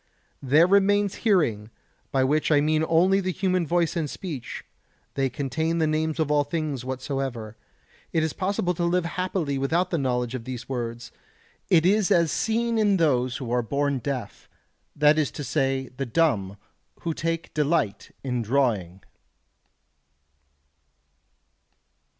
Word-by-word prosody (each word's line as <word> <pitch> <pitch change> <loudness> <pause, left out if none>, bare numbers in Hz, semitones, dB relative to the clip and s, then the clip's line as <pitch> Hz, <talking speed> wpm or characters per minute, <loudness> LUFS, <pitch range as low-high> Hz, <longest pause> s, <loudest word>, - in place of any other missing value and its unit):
There 145 +5 +5
remains 200 +1 +3
hearing, 140 - +1 0.4
by 135 -1 +2
which 150 +4 +1
I 145 - +5
mean 155 +1 +2
only 185 +4 +4
the 185 -1 -1
human 185 -2 0
voice 170 0 +1
and 160 -4 -1
speech; 150 -9 -6 0.5
they 135 -1 0
contain 160 +5 -2
the 160 - +2
names 155 +1 -1
of 155 -2 +1
all 145 -1 +3
things 145 -3 -3
whatsoever. 130 -4 -4 0.6
It 160 - +1
is 160 - -1
possible 185 -1 -1
to 175 - -3
live 175 0 +1
happily 170 -5 -2
without 170 +7 0
the 170 - 0
knowledge 125 -2 -1
of 130 -3 -4
these 125 -1 -7
words, 120 -2 -5 0.6
as 170 - +6 0.3
is 170 -2 +3
seen 230 0 0
in 205 -2 +3
those 130 -6 +1
who 125 -4 -6
are 125 0 +2
born 140 +3 -1
deaf, 130 0 -5 0.5
that 150 +1 +4
is 150 - +1
to 145 - -5
say, 135 -1 -1
the 135 -1 -3
dumb, 110 - +1 0.4
who 165 - -2
take 165 +1 -3
delight 150 -9 0
in 125 -3 -1
drawing. 105 -7 0
150 Hz, 145 wpm, -25 LUFS, 130-170 Hz, 0.6 s, as